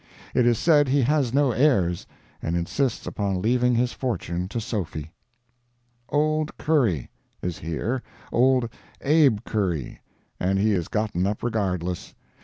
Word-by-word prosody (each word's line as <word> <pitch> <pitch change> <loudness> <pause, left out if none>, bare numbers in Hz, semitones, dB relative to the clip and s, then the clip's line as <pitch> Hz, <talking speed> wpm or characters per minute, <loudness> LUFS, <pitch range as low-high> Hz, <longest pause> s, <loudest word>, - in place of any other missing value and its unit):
It 125 -2 +3
is 120 -2 +4
said 150 -4 +4
he 135 +1 +3
has 140 -2 +2
no 140 0 +3
heirs, 105 - +2 0.3
and 80 - -1
insists 115 +9 -1
upon 100 -3 -1
leaving 125 +4 +2
his 120 +1 +1
fortune 90 -8 -2
to 115 +5 -3
Sophy. 85 -8 -4 1.0
Old 155 +1 0
Curry 120 - +1 0.3
Is 90 -2 -3
here—old 125 +7 0 0.3
Abe 140 -7 +4
Curry. 90 - -2 0.4
And 95 +2 +1
he 105 +2 +3
is 90 -5 0
gotten 105 -4 0
up 105 +1 -3
"regardless." 90 -7 -2
110 Hz, 130 wpm, -25 LUFS, 90-130 Hz, 1.0 s, is